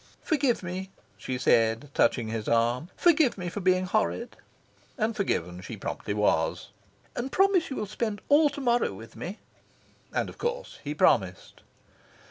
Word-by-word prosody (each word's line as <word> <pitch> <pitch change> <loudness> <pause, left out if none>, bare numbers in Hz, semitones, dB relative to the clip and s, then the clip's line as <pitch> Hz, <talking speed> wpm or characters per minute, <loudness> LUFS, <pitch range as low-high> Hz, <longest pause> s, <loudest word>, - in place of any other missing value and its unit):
"Forgive 280 - +1
me," 185 +2 -5 0.3
she 130 - -4
said, 115 +2 +2
touching 115 -3 +2
his 110 -1 -4
arm. 120 +7 +1
"Forgive 315 -9 +4
me 180 -2 -4
for 205 - -5
being 185 -1 +2
horrid." 215 +4 -1 0.6
And 225 -1 0
forgiven 90 - -1
she 90 - -7
promptly 100 - -4
was. 90 -6 +1 0.5
"And 260 +3 -3
promise 385 -3 +3
you 270 - -4
will 210 - -2
spend 210 0 -3
all 295 +1 +5
to 285 0 -7
morrow 240 - +2
with 110 +3 -12
me." 190 +6 -6 0.7
And - - -1
of - - -11
course 485 +1 -3
he - - -4
promised. - - +1
195 Hz, 155 wpm, -27 LUFS, -, 0.7 s, all